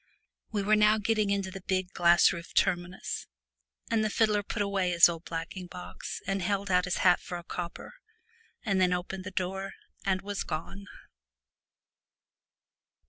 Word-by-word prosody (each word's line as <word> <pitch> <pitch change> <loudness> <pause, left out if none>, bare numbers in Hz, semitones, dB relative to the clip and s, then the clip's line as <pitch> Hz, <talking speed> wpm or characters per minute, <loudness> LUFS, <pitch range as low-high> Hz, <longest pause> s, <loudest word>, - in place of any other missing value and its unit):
We 205 -2 -1
were 215 +2 +4
now 215 0 +5
getting 215 -1 +1
into 200 -1 -1
the 195 0 -8
big 185 0 -2
glass 175 0 +5
roofed 170 -1 -8
terminus, 180 0 0 0.6
and 220 -1 +2
the 215 - +1
fiddler 210 -1 +2
put 205 +1 -2
away 195 -2 0
his 170 -1 +7
old 170 -1 -5
blacking 170 +2 -5
box 180 0 -7
and 195 0 -1
held 200 +1 -1
out 180 0 +3
his 180 - -1
hat 180 -1 +6
for 175 - -5
a 175 - -9
copper, 170 - -6 0.7
and 195 -3 +2
then 180 -1 +4
opened 185 +1 -4
the - - -4
door 190 +1 -3 0.3
and 190 -1 0
was 205 0 -3
gone. 195 +6 -6
190 Hz, 160 wpm, -29 LUFS, 180-200 Hz, 0.7 s, his